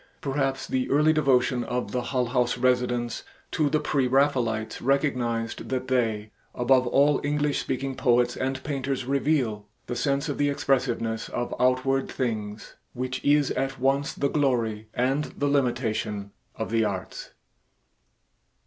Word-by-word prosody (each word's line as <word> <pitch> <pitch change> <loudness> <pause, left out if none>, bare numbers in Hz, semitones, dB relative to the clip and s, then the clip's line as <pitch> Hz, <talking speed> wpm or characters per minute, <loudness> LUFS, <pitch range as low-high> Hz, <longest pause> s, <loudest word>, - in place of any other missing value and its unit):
Perhaps 135 -1 -1
the 130 -1 -1
early 150 +3 +4
devotion 130 -4 +2
of 125 +1 -3
the 125 - -1
Hull 125 0 -1
House 125 0 0
residents 125 -2 0 0.3
to 150 -2 +1
the 155 - +2
pre 135 -4 +1
Raphaelites 125 -5 +1
recognized 125 -4 0
that 130 0 -2
they 110 -4 0 0.2
above 125 +1 +3
all 140 +3 +3
English 145 0 0
speaking 135 +1 -2
poets 120 -1 +2
and 130 0 -2
painters 135 -3 -2
reveal 130 -6 0 0.2
"the 120 - -4
sense 140 +3 0
of 145 - -3
the 145 0 +3
expressiveness 120 -5 0
of 120 - -3
outward 130 +2 +2
things" 110 -4 -4 0.2
which 130 0 -4
is 145 -1 +3
at 135 0 -2
once 135 +2 +1
the 140 - 0
glory 115 -7 0
and 135 +4 +1
the 145 - 0
limitation 120 -7 0 0.2
of 110 - -4
the 115 -1 +2
arts. 100 -3 -4
130 Hz, 140 wpm, -26 LUFS, 120-140 Hz, 0.3 s, early